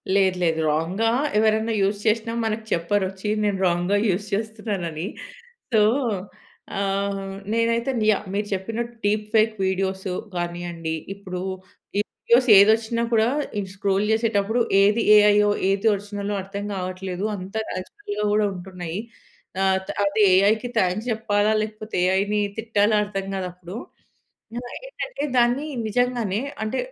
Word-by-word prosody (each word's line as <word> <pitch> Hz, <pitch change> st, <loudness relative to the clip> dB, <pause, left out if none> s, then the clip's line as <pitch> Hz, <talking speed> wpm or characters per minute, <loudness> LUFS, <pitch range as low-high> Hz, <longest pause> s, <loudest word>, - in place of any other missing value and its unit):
లేదు, 190 Hz, -2 st, +3 dB
లేదు. 165 Hz, -1 st, +1 dB
రాంగ్‌గా 180 Hz, +9 st, 0 dB, 0.3 s
ఎవరన్నా 220 Hz, +1 st, +2 dB
యూజ్ 200 Hz, +1 st, +1 dB
చేసినా, 225 Hz, +1 st, +1 dB
మనకు 220 Hz, 0 st, -2 dB
చెప్పరొచ్చి 190 Hz, +3 st, -1 dB
నేను 205 Hz, -2 st, +1 dB
రాంగ్‌గా 175 Hz, +3 st, +1 dB
యూజ్ 195 Hz, +2 st, 0 dB
చేస్తున్నానని. 200 Hz, -6 st, -3 dB, 0.7 s
సో, 220 Hz, -2 st, +5 dB, 1.0 s
ఆహ్, 195 Hz, 0 st, -2 dB, 0.2 s
నేనైతేను 230 Hz, +1 st, +1 dB
యాహ్, 210 Hz, -, 0 dB
మీరు 205 Hz, +1 st, -1 dB
చెప్పినట్టు 225 Hz, +5 st, -4 dB
డీప్ 210 Hz, +1 st, +1 dB
ఫేక్ 220 Hz, 0 st, +4 dB
వీడియోసు 190 Hz, 0 st, -1 dB, 0.2 s
గానియండి. 175 Hz, -2 st, -3 dB, 0.2 s
ఇప్పుడు 185 Hz, -2 st, -6 dB, 0.6 s
ఈ -, -, +4 dB, 0.2 s
వీడియోస్ 250 Hz, +2 st, +3 dB
ఏదొచ్చిన 220 Hz, +3 st, +4 dB
కూడా, 225 Hz, 0 st, +4 dB, 0.3 s
ఇది 195 Hz, -2 st, -3 dB
స్క్రోల్ 195 Hz, +1 st, +1 dB
జేసేటప్పుడు, 220 Hz, 0 st, +1 dB, 0.2 s
ఏది 210 Hz, +3 st, +3 dB
ఏఐయో, 210 Hz, 0 st, +5 dB, 0.2 s
ఏది 195 Hz, +3 st, 0 dB
ఒరిజిన‌లో 205 Hz, 0 st, -4 dB
అర్థం 200 Hz, +1 st, -6 dB
కావట్లేదు. 185 Hz, 0 st, -4 dB
అంత 185 Hz, +1 st, -9 dB, 0.2 s
న్యాచురల్‌గా 410 Hz, -, -5 dB
కూడా 210 Hz, 0 st, +3 dB
ఉంటున్నాయి. 180 Hz, -1 st, -6 dB, 0.7 s
ఆత్ 190 Hz, 0 st, 0 dB
అటు 200 Hz, +2 st, 0 dB, 0.2 s
ఏఐకి 215 Hz, +5 st, +3 dB
థాంక్స్ 195 Hz, +4 st, 0 dB
చెప్పాలా, 215 Hz, -1 st, +1 dB
లేకపోతే 215 Hz, 0 st, -6 dB
ఏఐని 200 Hz, +3 st, +1 dB, 0.2 s
తిట్టాలా 220 Hz, -1 st, +2 dB
అర్థం 195 Hz, -1 st, -4 dB
కాదప్పుడూ. 180 Hz, 0 st, -6 dB, 0.8 s
ఆహ్, 245 Hz, 0 st, -7 dB
ఏంటంటే -, -, -5 dB
దాన్ని 245 Hz, +5 st, +2 dB, 0.2 s
నిజంగానే 240 Hz, -2 st, 0 dB, 0.2 s
అంటే 220 Hz, +4 st, -2 dB
205 Hz, 125 wpm, -23 LUFS, 190-220 Hz, 1.0 s, సో